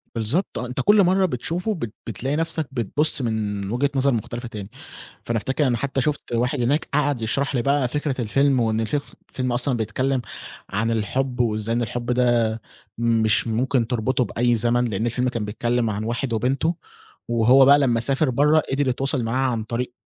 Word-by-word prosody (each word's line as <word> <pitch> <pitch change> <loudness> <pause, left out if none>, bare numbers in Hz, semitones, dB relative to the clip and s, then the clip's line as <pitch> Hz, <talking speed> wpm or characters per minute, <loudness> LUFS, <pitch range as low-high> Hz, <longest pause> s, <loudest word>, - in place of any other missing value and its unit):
بالضبط 120 - -1
آه، 125 - -3
أنت 125 0 -3
كل 205 -1 +5
مرّة 190 +1 +3
بتشوفه 175 - -2
بت 120 - -5
بتلاقي 130 +5 -2
نفْسك 165 -1 -1
بتبُصّ 135 +5 +1
من 105 -4 -2
وجهة 140 +4 +1
نظر 135 +1 +3
مختلفة 120 +2 -4
تاني، 105 -3 -8 0.6
فأنا 115 -1 0
أفتكر 135 +6 0
أنا 120 -2 +1
حتى 135 +2 -1
شُفت 145 -3 -2
واحد 125 +1 0
هناك 145 +6 +1
قعد 145 -4 +1
يشرح 135 +5 -1
لي 120 - +2
بقى 140 -1 +1
فكرة 140 -1 -2
الفيلم 135 +4 +2
وإن 110 -1 +1
الف 115 +6 -2 0.3
الفيلم 130 -1 -2
أصلًا 120 +1 +1
بيتكلم 125 +4 -1 0.5
عن 115 +4 -1
الحب 125 +4 -1
وإزاي 110 -1 0
إن 120 - 0
الحب 120 +1 -3
ده 120 -3 +2 0.4
مش 115 -1 +2
ممكن 120 +1 0
تربطه 125 +1 0
بأي 120 +3 +1
زمن؛ 120 +2 +1
لأن 110 +2 -2
الفيلم 125 +2 0
كان 115 -4 -3
بيتكلم 120 +2 -1
عن 105 0 -3
واحد 120 +2 -2
وبنته 135 +9 0 0.5
وهو 120 +3 +5
بقى 140 +2 +7
لمّا 120 -5 +2
سافر 135 +4 0
برّا 150 +5 +4
قدر 140 0 +1
يتواصل 135 0 0
معاها 130 +3 0
عن 115 -2 -2
طريق 120 +2 -4
125 Hz, 180 wpm, -23 LUFS, 115-135 Hz, 0.6 s, بقى